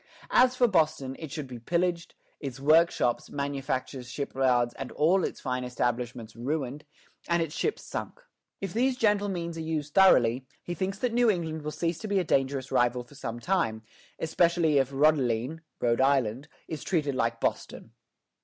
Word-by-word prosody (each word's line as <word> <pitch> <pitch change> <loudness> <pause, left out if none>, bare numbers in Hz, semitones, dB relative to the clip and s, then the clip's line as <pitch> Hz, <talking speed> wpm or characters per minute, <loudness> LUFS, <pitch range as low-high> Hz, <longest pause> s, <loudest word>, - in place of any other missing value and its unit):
As 255 0 +5
for 250 -1 +4
Boston, 155 - +1
it 160 -4 -7
should 150 -1 -4
be 125 -2 -9
pillaged, 170 +6 -1 0.2
its 135 -3 -6
workshops, 155 -4 +3
manufactures, 135 -2 -3
shipyards, 125 -3 +1 0.2
all 175 +5 +3
its - - -3
fine 125 -1 -2
establishments 120 -2 -3
ruined, 140 +3 -3 0.4
and 170 -1 +2
its 155 -2 -6
ships 435 - -2
sunk." - - -6 0.4
If 195 -3 -4
these 250 +3 +1
gentle 205 -3 +2
means 170 -3 -4
are - - -3
used 155 -2 -3
thoroughly, 130 -9 +5 0.2
he 175 - -4
thinks 190 +3 -2
that 240 +2 -1
New 240 -1 +4
England 160 -5 -1
will 150 - -4
cease 165 +1 -2
to 220 - -5
be 200 -1 +1
a 185 - +3
dangerous 135 -3 0
rival 125 -1 +2
for 120 - -19
some 120 -4 -5
time, 120 -10 0 0.3
especially 160 -2 +2
if 135 -1 +1
"Rhodelene" 140 -1 +2 0.2
(Rhode 120 +1 +2
Island) 135 -1 +2 0.2
is 155 -3 -5
treated 150 -6 0
like 115 -2 0
Boston. - - -3
150 Hz, 165 wpm, -28 LUFS, 125-170 Hz, 0.4 s, As